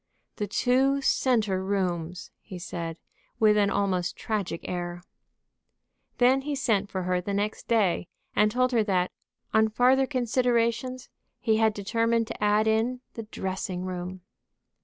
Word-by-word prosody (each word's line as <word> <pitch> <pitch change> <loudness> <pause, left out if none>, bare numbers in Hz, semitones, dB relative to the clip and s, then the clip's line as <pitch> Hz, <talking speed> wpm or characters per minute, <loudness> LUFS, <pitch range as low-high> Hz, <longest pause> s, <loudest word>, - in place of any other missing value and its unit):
"The 210 - -2
two 265 +6 +2
centre 215 -9 +2
rooms!" 180 -3 -2
he 185 - -9
said, 170 -2 -5 0.4
with 215 -2 +5
an 205 -1 +3
almost 185 -3 0
tragic 200 -6 -3
air. 175 0 -4 1.1
Then 255 +2 +4
he 290 +1 -3
sent 220 -7 +1
for 185 -1 -3
her 180 0 0
the 200 +2 -3
next 205 +1 -2
day, 205 -7 +2 0.3
and 210 0 +4
told 255 +3 +1
her 230 -3 +3
that, 185 -3 +1 0.4
on 220 0 +4
farther 255 +4 +3
considerations, 250 -1 0 0.3
he 220 -3 +2
had 220 -1 +3
determined 230 +3 +1
to - - -5
add 210 +1 +3
in 225 +3 +1
the 225 -2 -7
dressing 185 -2 -4
room. 180 0 -5
210 Hz, 140 wpm, -27 LUFS, 185-240 Hz, 1.1 s, with